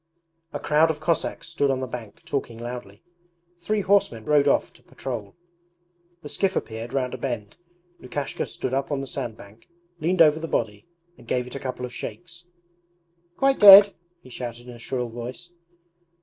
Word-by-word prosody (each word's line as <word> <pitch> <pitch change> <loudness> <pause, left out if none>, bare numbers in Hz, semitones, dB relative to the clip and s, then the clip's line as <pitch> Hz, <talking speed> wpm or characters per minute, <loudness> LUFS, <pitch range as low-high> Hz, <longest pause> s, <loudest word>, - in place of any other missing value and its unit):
A - - -4
crowd 155 +2 +3
of 155 -2 -2
Cossacks 165 +2 -1
stood 155 -4 0
on 135 -1 +1
the 130 - -2
bank 120 -4 -9
talking 130 -5 -3
loudly. 120 -3 -8 0.6
Three 210 +5 -1
horsemen 190 - +2
rode 145 0 +3
off 140 - +2
to - - -21
patrol. 115 -7 -7 0.9
The 150 - -7
skiff 195 +3 0
appeared 115 +1 -4
round 130 -2 -1
a 130 - -6
bend. 115 -6 -4 0.5
Lukashka 140 +2 -4
stood 130 - -4
up 135 +2 -1
on 140 -1 -1
the - - -4
sandbank, 115 -3 -7 0.3
leaned 170 +3 0
over 155 0 +4
the 165 - -4
body, 105 -2 -2 0.3
and 120 - -16
gave 125 0 0
it 125 - -10
a 140 - -5
couple 125 -1 -4
of 125 - -9
shakes. 175 0 -8 0.9
'Quite 270 0 +2
dead!' 200 0 +11 0.3
he 130 - -14
shouted 120 0 -7
in 125 - -9
a 120 - -12
shrill 125 +1 -3
voice. 120 +9 -8
130 Hz, 175 wpm, -24 LUFS, 120-160 Hz, 0.9 s, dead